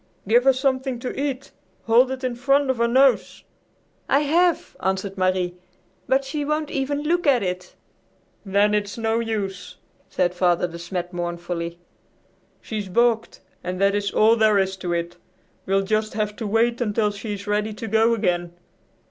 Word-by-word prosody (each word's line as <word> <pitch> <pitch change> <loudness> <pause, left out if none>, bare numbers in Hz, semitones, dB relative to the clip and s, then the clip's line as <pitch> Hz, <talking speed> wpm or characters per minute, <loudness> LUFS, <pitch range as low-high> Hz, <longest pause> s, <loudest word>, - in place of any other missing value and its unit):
"Give 240 +4 +4
her 270 - +6
something 260 -1 -1
to 245 +2 -5
eat. 275 -1 -3 0.3
Hold 240 +3 +4
it 260 0 -5
in 255 -1 -1
front 275 +2 +2
of 260 - -4
her 235 0 +2
nose." 260 +1 +2 0.7
"I 275 - +4
have," 335 +3 +1
answered 190 +1 -2
Marie, 185 -1 0 0.5
"but 270 +1 +2
she 295 +2 -3
won't 300 +1 -2
even 285 +2 -2
look 345 +2 0
at 255 -6 +4
it." 180 0 -4 0.7
"Then 205 +1 +2
it's 205 0 -1
no 225 0 0
use," 205 -5 -4 0.3
said 180 -1 0
Father 180 -1 +2
De 170 0 -9
Smet 175 +1 -5
mournfully. 175 -1 -4 0.8
"She's 210 -3 -5
balked 230 +3 +1 0.2
and 180 +1 -4
that 200 0 +3
is 205 0 0
all 220 +3 +4
there 215 -2 +4
is 190 -1 +1
to 180 -2 -4
it. 170 0 -3 0.5
We'll 195 +1 +2
just 215 +1 -1
have 210 -1 -1
to 220 - -4
wait 230 +3 +1
until 210 -2 +1
she 205 +1 -5
is 200 0 -9
ready 210 +1 0
to 225 +2 -7
go 225 +2 +3
again. 175 -4 -1
215 Hz, 170 wpm, -23 LUFS, 190-255 Hz, 0.8 s, her